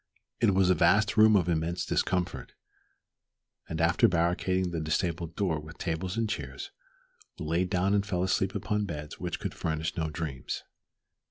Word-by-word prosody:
It 100 - +3
was 95 -1 +4
a - - +6
vast 100 +6 +3
room 110 -1 +7
of 90 -4 +3
immense 85 +1 0
discomfort, 90 -1 -1 1.1
and 80 - -3
after 80 +1 +4
barricading 90 +1 +1
the 85 - -2
disabled 85 +1 -1
door 90 -7 0
with 75 +2 -11
tables 90 +4 -3
and 115 -1 +1
chairs, - - -5 0.7
we 85 - -6
lay 85 +4 +1
down 95 +1 +1
and 100 -1 +3
fell 90 -3 -1
asleep 95 +1 0
upon 105 0 -1
beds 75 -5 -6
which - - -3
could - - -4
furnish 80 +1 -2
no 80 -2 -1
dreams. 75 -4 -4
90 Hz, 165 wpm, -29 LUFS, 80-95 Hz, 1.1 s, room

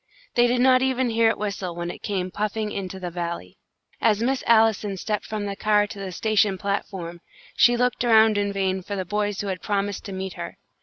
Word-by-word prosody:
They 240 0 +4
did 245 0 +1
not 255 0 +5
even 260 -2 +1
hear 225 0 +4
it - - -1
whistle 195 -4 -4
when 175 0 -3
it - - -11
came 185 -3 -2
puffing 210 +1 -2
into 190 -1 -5
the 180 -1 -5
Valley. 170 - -5 0.4
As 220 0 +3
Miss 265 +2 0
Allison 220 -3 +3
stepped 210 +2 -3
from 215 -1 -3
the 200 -1 -3
car 210 0 +3
to 205 -1 -9
the 195 -1 -5
station 210 0 +1
platform, 185 -3 -4 0.3
she 240 0 +5
looked 250 0 +1
around 220 -2 +5
in 205 0 0
vain 190 -1 -1
for 200 +3 -5
the 190 -1 -3
boys 205 +1 -1
who 205 - -4
had 185 -2 -4
promised 200 -1 -2
to 200 - -6
meet 190 0 -4
her. - - -7
205 Hz, 215 wpm, -24 LUFS, 190-220 Hz, 0.4 s, not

